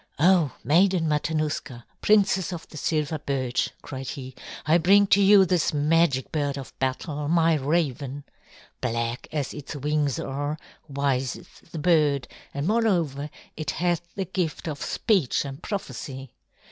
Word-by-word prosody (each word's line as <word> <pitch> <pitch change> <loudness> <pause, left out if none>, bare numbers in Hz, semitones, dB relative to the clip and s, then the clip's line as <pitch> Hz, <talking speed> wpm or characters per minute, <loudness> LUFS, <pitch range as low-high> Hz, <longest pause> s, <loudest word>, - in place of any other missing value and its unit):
"Oh, 170 -2 +4
Maiden 175 +4 +3
Matanuska, 150 -5 -2 0.2
Princess 195 -3 +3
of 170 -2 -6
the 155 - -10
Silver 155 0 -1
Birch," 130 -3 -1
cried 135 -2 -6
he, 130 -2 -6 0.3
"I 160 +3 +4
bring 200 +4 +6
to 200 0 +4
you 195 -1 +7
this 175 -4 +1
magic 150 -2 +2
bird 145 -3 -1
of 135 - -8
battle, 145 +3 -2
my 165 +1 +4
raven. 145 -2 -1 0.6
Black 115 -1 -2
as 145 -4 -2
its 150 0 -7
wings 145 -1 0
are, 145 +3 -3 0.3
wise 135 -3 0
is - - -13 0.2
the - - -6
bird, 150 -5 +2 0.2
and 140 +1 -3
moreover 175 - +1 0.3
it 155 -2 -4
hath 175 +1 0
the 195 - -2
gift 175 -3 -3
of 150 -3 -4
speech 185 - +1
and 135 0 -7
prophecy. 135 - -5
150 Hz, 145 wpm, -25 LUFS, 140-170 Hz, 0.6 s, you